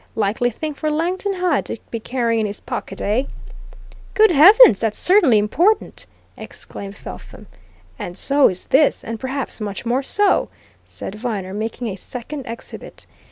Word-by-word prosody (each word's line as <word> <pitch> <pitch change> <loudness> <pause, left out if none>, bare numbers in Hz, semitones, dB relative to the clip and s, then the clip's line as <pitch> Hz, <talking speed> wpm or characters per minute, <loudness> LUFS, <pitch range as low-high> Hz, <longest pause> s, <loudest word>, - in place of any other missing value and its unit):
Likely 225 +3 0
thing 305 +6 -5
for 305 +2 -3
Langton 360 +6 -1
Hyde 360 -5 0
to - - -5
be 230 - -3
carrying 235 -1 -1
in 220 - 0
his 205 - -5
pocket, - - -6
eh?" 225 +7 0 0.9
"Good 435 -2 +5
heavens, 345 - +8
that's 225 -2 -1
certainly 355 - +4
important!" 335 - +1 0.3
exclaimed 200 0 -9
Felpham. - - -11 0.5
"And 175 +1 -6
so 280 +5 +4
is 185 -1 -6
this, 285 +2 +3
and 225 0 -6
perhaps 265 -2 -4
much 205 +1 -5
more 245 +3 +1
so," 395 +8 +2 0.4
said - - -8
Viner, 210 -4 -4
making 225 +3 -4
a 190 - -5
second 255 +6 -8
exhibit. 230 +1 -9
245 Hz, 155 wpm, -20 LUFS, 215-310 Hz, 0.9 s, heavens